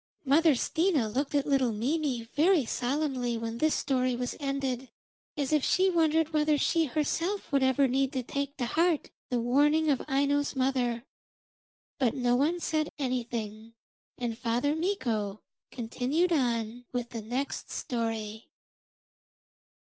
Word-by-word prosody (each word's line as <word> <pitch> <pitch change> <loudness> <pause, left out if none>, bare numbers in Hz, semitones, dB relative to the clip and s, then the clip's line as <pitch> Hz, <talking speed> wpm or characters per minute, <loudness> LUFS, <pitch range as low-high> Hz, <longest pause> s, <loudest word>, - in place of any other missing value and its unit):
Mother 300 +2 +5
Stina 315 - +1
looked 270 +7 -2
at 285 - +2
little 270 -4 +2
Mimi 255 +2 -1
very 320 -1 +4
solemnly 250 -1 -1
when 230 0 -4
this 310 0 +2
story 255 -2 0
was 245 0 -3
ended, 270 -3 -2 0.5
as 285 0 -1
if 300 -3 +3
she 375 +1 +3
wondered 320 -1 +2
whether 300 -1 +3
she 330 +3 +2
herself 325 +8 -2
would 275 -1 +3
ever 265 +1 +3
need 265 +1 +1
to 260 -2 -2
take 280 +3 -4
to 250 - -1
heart 330 +5 +1 0.2
the 245 - 0
warning 295 +6 +3
of 265 - +1
Aino's 285 +1 +1
mother. 255 -3 0 1.0
But 250 -5 +2
no 245 -2 +2
one 310 +7 +1
said 310 -2 -1
anything, 230 -4 -4 0.4
and 240 -2 -2
Father 245 +5 0
Mikko 230 - -2 0.3
continued 260 +9 -1
on 240 -4 -1
with 245 -1 -3
the 230 - -5
next 250 +6 -3
story. 225 -2 -4
265 Hz, 140 wpm, -29 LUFS, 240-300 Hz, 1.0 s, Mother